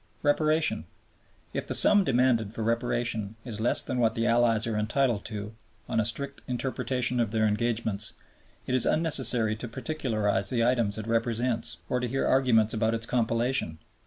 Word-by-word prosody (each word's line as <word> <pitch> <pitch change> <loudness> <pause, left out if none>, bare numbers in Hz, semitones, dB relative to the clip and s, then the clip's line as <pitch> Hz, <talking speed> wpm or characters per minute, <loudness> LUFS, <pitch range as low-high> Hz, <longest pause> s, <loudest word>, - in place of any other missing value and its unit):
Reparation. 155 +2 +1 0.7
If - - -4
the - - +2
sum 205 -1 +6
demanded 120 - +1
for 110 - -3
Reparation 115 -2 -1
is 110 -3 -6
less 120 - +1
than 125 - -3
what 115 -2 +2
the 115 - 0
Allies 115 -2 +3
are 115 -1 -2
entitled 115 +1 0
to 105 -1 -6 0.3
on - - 0
a 110 - +1
strict 140 +5 -4
interpretation 125 -1 -1
of 115 -3 +1
their 110 0 +1
engagements, 110 -1 0 0.5
it - - -3
is 130 - +4
unnecessary 130 -9 +2
to 120 - -6
particularize 110 -7 -1
the 115 -2 +1
items 120 -5 +1
it 110 - -5
represents 115 +1 -1
or 125 - 0
to 125 - -2
hear 135 +3 -1
arguments 115 -5 +3
about 110 0 0
its 115 0 -2
compilation. 120 - 0
115 Hz, 165 wpm, -27 LUFS, 110-125 Hz, 0.7 s, sum